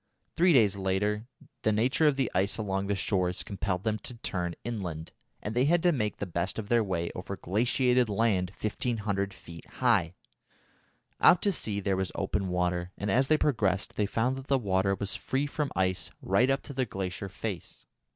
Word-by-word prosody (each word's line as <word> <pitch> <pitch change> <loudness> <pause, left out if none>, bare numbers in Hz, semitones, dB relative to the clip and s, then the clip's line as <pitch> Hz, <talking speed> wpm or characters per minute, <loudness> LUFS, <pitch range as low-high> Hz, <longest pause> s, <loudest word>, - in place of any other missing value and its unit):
Three 175 +2 +5
days 110 - +5
later 105 +3 0 0.3
the 110 - +2
nature 125 +8 +3
of 145 - +3
the 135 -3 0
ice 95 +2 +1
along 100 -2 -2
the 100 - +1
shores 90 -2 0
compelled 95 -2 -3
them 110 -1 0
to 125 - -7
turn 90 -6 -3
inland, 90 -9 -4 0.3
and 105 - -3
they 125 +3 +3
had 170 +3 +3
to 175 - +5
make 105 -9 -1
the - - -3
best 85 0 -2
of 110 -2 -5
their 120 -1 +4
way 85 -4 -2
over 95 +2 -6
glaciated 125 +4 +2
land 100 -4 +1
1500 105 -3 -1
feet 85 -3 -12
high. 85 +3 +2 1.0
Out 180 - +6
to 205 - +3
sea 105 - -2
there 100 -1 0
was 95 -2 -1
open 95 -2 -1
water, 90 -1 0
and 100 0 -2
as 130 +5 +3
they 155 - +4
progressed 105 -11 0
they 105 - +1
found 125 +5 0
that 135 0 -9
the 135 - +3
water 100 -4 +1
was 100 0 -2
free 135 +2 -1
from 145 0 -2
ice 95 -2 0
right 125 +2 +2
up 135 +1 +1
to 140 - -8
the 130 -2 -1
glacier 95 0 -4
face. 95 -1 -6
105 Hz, 190 wpm, -29 LUFS, 95-125 Hz, 1.0 s, Out